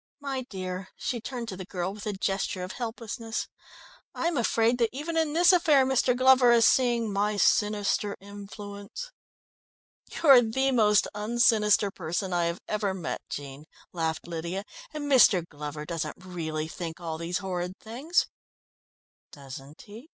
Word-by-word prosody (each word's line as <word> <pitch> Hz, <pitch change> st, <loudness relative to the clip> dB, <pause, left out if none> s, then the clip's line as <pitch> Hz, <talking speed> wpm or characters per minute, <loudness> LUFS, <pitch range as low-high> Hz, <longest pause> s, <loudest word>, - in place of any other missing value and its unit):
My 275 Hz, -2 st, -3 dB
dear," 185 Hz, -1 st, -5 dB
she 240 Hz, -3 st, -3 dB
turned 240 Hz, 0 st, -5 dB
to 190 Hz, -, -5 dB
the 190 Hz, -, -7 dB
girl 185 Hz, 0 st, -4 dB
with 210 Hz, +1 st, -8 dB
a 210 Hz, -, -1 dB
gesture 195 Hz, -1 st, -2 dB
of 180 Hz, -, -5 dB
helplessness. 230 Hz, -1 st, -5 dB, 0.7 s
"I -, -, -3 dB
am 340 Hz, -, 0 dB
afraid 235 Hz, -1 st, +2 dB
that 230 Hz, -2 st, +3 dB
even 300 Hz, +6 st, -5 dB
in 320 Hz, -2 st, +1 dB
this 350 Hz, +3 st, +5 dB
affair 310 Hz, -7 st, +4 dB
Mr. 255 Hz, -1 st, +2 dB
Glover 255 Hz, -1 st, +6 dB
is 230 Hz, -1 st, +5 dB
seeing 235 Hz, -4 st, +2 dB
my 205 Hz, +1 st, 0 dB
sinister 205 Hz, 0 st, +1 dB
influence!" 205 Hz, -, -9 dB, 1.1 s
"You're 275 Hz, -5 st, +9 dB
the 265 Hz, +4 st, 0 dB
most 210 Hz, -4 st, +4 dB
un 210 Hz, +3 st, -4 dB
sinister 210 Hz, -4 st, +4 dB
person 180 Hz, +1 st, -3 dB
I 175 Hz, -1 st, +1 dB
have 170 Hz, +1 st, -3 dB
ever 205 Hz, -2 st, -1 dB
met, 175 Hz, -3 st, -4 dB
Jean," 140 Hz, +1 st, -7 dB, 0.3 s
laughed 160 Hz, -2 st, -2 dB
Lydia, 170 Hz, +3 st, -4 dB, 0.3 s
"and 305 Hz, -1 st, -5 dB
Mr. 240 Hz, -, +5 dB
Glover 150 Hz, 0 st, -7 dB
doesn't 165 Hz, -2 st, -4 dB
really 160 Hz, -4 st, -4 dB
think 165 Hz, 0 st, -6 dB
all 160 Hz, -2 st, -5 dB
these 170 Hz, +2 st, -2 dB
horrid 180 Hz, -1 st, -4 dB
things." 275 Hz, +11 st, 0 dB, 1.1 s
"Doesn't 140 Hz, +1 st, -11 dB
he?" 225 Hz, +9 st, -13 dB
205 Hz, 155 wpm, -27 LUFS, 180-245 Hz, 1.1 s, You're